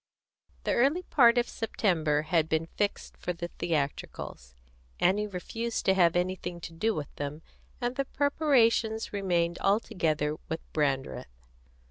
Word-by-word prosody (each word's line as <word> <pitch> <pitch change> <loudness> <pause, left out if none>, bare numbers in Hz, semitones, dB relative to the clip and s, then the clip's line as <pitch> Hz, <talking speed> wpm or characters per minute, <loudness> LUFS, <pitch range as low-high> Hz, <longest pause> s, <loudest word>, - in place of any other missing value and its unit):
The - - +1
early 285 +9 +3
part 245 -8 +5
of 240 - +3
September 160 -9 0
had 160 -1 +1
been 160 +1 +1
fixed 205 -1 -2
for 180 - -3
the 170 0 -5
theatricals. 140 - -3 0.4
Annie 205 +4 +3
refused 225 +5 -4
to 190 - +5
have 175 -3 +4
anything 180 -1 -1
to 165 - -7
do 215 +7 0
with 150 -2 -5
them, 145 +2 -5 0.4
and 245 0 -2
the 275 0 0
preparations 245 -8 +2
remained 175 -4 0
altogether 165 -8 +1
with 160 0 -3
Brandreth. 135 - -2
180 Hz, 135 wpm, -29 LUFS, 155-225 Hz, 0.4 s, part